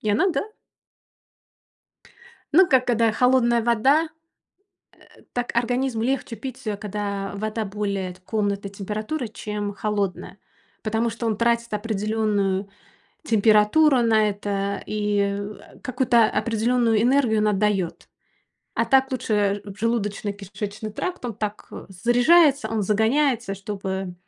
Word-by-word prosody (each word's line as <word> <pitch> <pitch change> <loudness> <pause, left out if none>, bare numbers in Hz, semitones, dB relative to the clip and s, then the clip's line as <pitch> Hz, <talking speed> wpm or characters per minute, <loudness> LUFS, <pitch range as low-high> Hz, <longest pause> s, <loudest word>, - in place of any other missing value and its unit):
И 215 - -3
она, 215 - +3
да. 405 +5 -3 2.0
Ну 375 +5 +7
как, 260 -3 +3
когда 230 -2 +3
холодная 240 0 +3
вода, 260 +8 +3 1.0
э, - - -20
так 245 0 -2
организму 245 0 0
легче 250 -1 -1
пить 260 +1 -8
её, 210 -2 -2
когда 200 -1 -4
вода 215 +2 -3
более 200 -2 -3
т 185 - -21
комнатной 200 -1 -2
температуры, 215 +7 -4
чем 210 -1 -5
холодная, 200 -2 -3 0.4
потому 225 +1 0
что 230 +1 -4
он 220 - 0
тратит 235 +1 +1
определённую 210 -2 -1 0.6
температуру 225 +5 +4
на 220 -2 +3
это 200 0 -3
и, 210 -1 0
а, 200 +1 -4
какую-то 250 -3 +3
определённую 230 0 +1
энергию 245 -3 +3
он 210 0 +2
отдаёт. 200 -3 0 0.7
А - - +1
так 265 0 +3
лучше, 205 -5 0
желудочно-кишечный 205 -1 -4
тракт- 365 - -4
он 235 -3 -3
так 210 0 -5 0.2
заряжается, 245 - +4
он 220 -2 -1
загоняется, 225 +2 +1
чтобы 195 -2 -5
215 Hz, 120 wpm, -23 LUFS, 205-240 Hz, 2.0 s, Ну